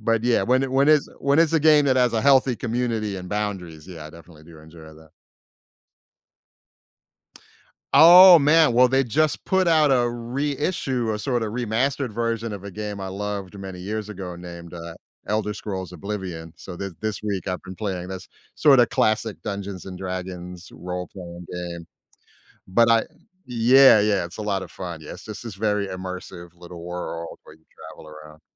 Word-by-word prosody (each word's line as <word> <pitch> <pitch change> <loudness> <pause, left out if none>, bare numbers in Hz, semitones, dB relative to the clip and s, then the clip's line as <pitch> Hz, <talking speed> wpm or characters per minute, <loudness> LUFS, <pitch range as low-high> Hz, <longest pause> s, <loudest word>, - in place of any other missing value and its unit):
But, 115 +1 0
yeah, 120 -1 +2
when 130 +2 +2
it 135 - -2
when 135 +2 +3
it 155 -1 +6 0.2
when 140 +2 +1
it's 165 -1 +3
a 160 - +3
game 150 -1 +5
that 130 -1 +2
has 125 -2 +3
a 110 - 0
healthy 135 -1 +4
community 115 -3 -2
and 90 -1 -8
boundaries, 95 -7 -4
yeah, 80 -4 -9
I - - -11
definitely 85 -2 -16
do 80 -1 -15
enjoy 80 +2 -15
that. 80 0 -18 2.8
Oh, 175 +4 +10
man! 155 -2 +4
Well, 125 +1 +5
they 135 +1 +2
just 155 +6 0
put 190 0 +2
out 155 -4 +4
a 120 -2 +2
reissue, 130 0 -2
a 105 - -4
sorta 120 -1 -1
remastered 125 +4 -1
version 115 0 -2
of 100 -1 -8
a 100 - -7
game 105 0 -6
I 95 - -5
loved 100 0 -5
many 95 -2 -8
years 105 +3 -5
ago 90 -4 -7
named, 85 -1 -10
uh, 85 -1 -8 0.3
Elder 105 0 -1
Scrolls: 95 -4 -6
Oblivion, 90 -3 -6
so, 90 - -9
th 100 +2 -5
this 110 -2 -4
week 100 -4 -3
I've 90 0 -3
been 95 - -9
playing 95 -3 -4
this 95 -1 -8 0.3
sorta 135 -5 +5
classic 110 -1 0
Dungeons& 100 -2 -6
Dragons 90 -1 -7
role 90 +2 -6
playing 90 -2 -10
game. 85 -1 -6 0.8
But 115 +5 +3
I 115 -1 +4 0.4
Yeah, 125 0 +6
yeah 105 -4 +1
it's 85 - -13
a 110 - -5
lotta 95 -3 -2
fun, 85 +1 -8
yes, 75 - -9
it's - - -15
just 110 -1 -8
this 115 -4 -7
very 105 0 -1
immersive 90 -1 -8
little 85 -1 -11
world 85 -1 -6
where - - -15
you 80 - -32 0.3
travel - - -14
around. 75 0 -13
105 Hz, 175 wpm, -23 LUFS, 90-120 Hz, 2.8 s, Oh